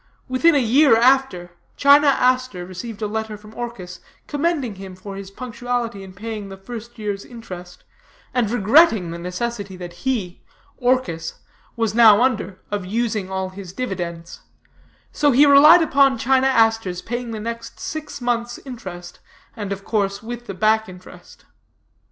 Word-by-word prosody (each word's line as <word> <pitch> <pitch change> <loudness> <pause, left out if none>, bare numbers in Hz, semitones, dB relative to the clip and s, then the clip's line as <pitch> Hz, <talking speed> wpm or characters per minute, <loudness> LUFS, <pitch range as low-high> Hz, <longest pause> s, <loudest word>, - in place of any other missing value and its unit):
Within 290 +6 +3
a - - +5
year 265 0 +5
after, 240 -8 +2 0.3
China 285 +1 +6
Aster 255 -8 +1
received 205 +4 -7
a - - 0
letter 220 0 -4
from 210 +1 -15
Orchis, 205 -7 -7 0.3
commending 290 -6 -1
him 190 -1 -9
for 195 +2 -9
his 195 -1 -8
punctuality 240 -1 -4
in 190 -1 -11
paying 210 0 -6
the 195 - -9
first 235 +4 -9
year's 205 -2 -4
interest, 180 -7 -10 0.5
and 240 -4 +1
regretting 220 - +4
the 170 - -6
necessity 200 +3 -4
that 175 -1 -9
he 200 -9 -2 0.4
(Orchis) 245 -11 0 0.4
was 225 -3 -1
now 225 -1 +7
under 215 -7 -1
of 205 -2 -2
using 215 0 -2
all 190 0 -3
his 185 -1 -10
dividends; 175 -8 -5 0.7
so 295 - +2
he 280 +2 +6
relied 300 +4 +8
upon 275 -4 +3
China 265 +3 +2
Aster's 225 -7 +2
paying 240 0 -4
the 220 -1 -5
next 230 +1 -6
six 305 -2 -6
months' 240 -1 -2
interest, 180 -9 -9 0.4
and 205 -4 -5
of 195 0 -5
course 200 -2 -1
with 240 +1 -7
the 195 - -6
back 220 +1 +2
interest. 185 0 -14
225 Hz, 150 wpm, -21 LUFS, 190-250 Hz, 0.7 s, relied